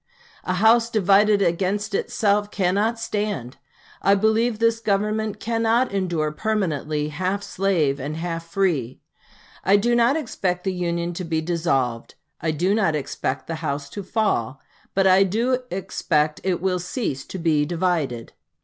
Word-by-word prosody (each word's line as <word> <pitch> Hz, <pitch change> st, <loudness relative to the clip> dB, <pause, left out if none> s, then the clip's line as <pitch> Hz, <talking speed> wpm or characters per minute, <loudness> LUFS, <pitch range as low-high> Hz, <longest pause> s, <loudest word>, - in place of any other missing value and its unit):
'A 185 Hz, -, 0 dB
house 225 Hz, +4 st, +4 dB
divided 205 Hz, -1 st, +4 dB
against 195 Hz, +5 st, 0 dB
itself 205 Hz, 0 st, +1 dB
cannot 205 Hz, +4 st, 0 dB
stand.' 205 Hz, -, -3 dB, 0.4 s
I 200 Hz, -, +4 dB
believe 220 Hz, +3 st, +2 dB
this 230 Hz, 0 st, +2 dB
Government 215 Hz, 0 st, -1 dB
cannot 230 Hz, +2 st, +1 dB
endure 175 Hz, -6 st, -1 dB
permanently, 155 Hz, -6 st, -1 dB
half 185 Hz, +6 st, -2 dB
slave 170 Hz, -10 st, 0 dB
and 145 Hz, +3 st, -4 dB
half 165 Hz, 0 st, -4 dB
free. 165 Hz, -, -1 dB, 0.6 s
I 195 Hz, -, +4 dB
do 235 Hz, +4 st, +2 dB
not 240 Hz, +5 st, +3 dB
expect 185 Hz, -, -2 dB
the 190 Hz, -, -1 dB
Union 170 Hz, -1 st, -2 dB
to 180 Hz, -, -5 dB
be 165 Hz, -2 st, -1 dB
dissolved 155 Hz, -8 st, -1 dB, 0.3 s
I 160 Hz, -, -1 dB
do 175 Hz, +6 st, +1 dB
not 195 Hz, -8 st, +2 dB
expect 130 Hz, -2 st, -3 dB
the 165 Hz, -, -4 dB
house 140 Hz, -2 st, -3 dB
to 205 Hz, -, -5 dB
fall 185 Hz, -, -1 dB, 0.4 s
but 195 Hz, 0 st, +3 dB
I 190 Hz, 0 st, +6 dB
do 230 Hz, +7 st, +1 dB
expect 155 Hz, -5 st, -1 dB
it 180 Hz, -3 st, 0 dB
will 185 Hz, -1 st, +1 dB
cease 175 Hz, -, -3 dB
to -, -, -6 dB
be 160 Hz, -4 st, +2 dB
divided. 165 Hz, -9 st, -1 dB
185 Hz, 150 wpm, -23 LUFS, 160-210 Hz, 0.6 s, I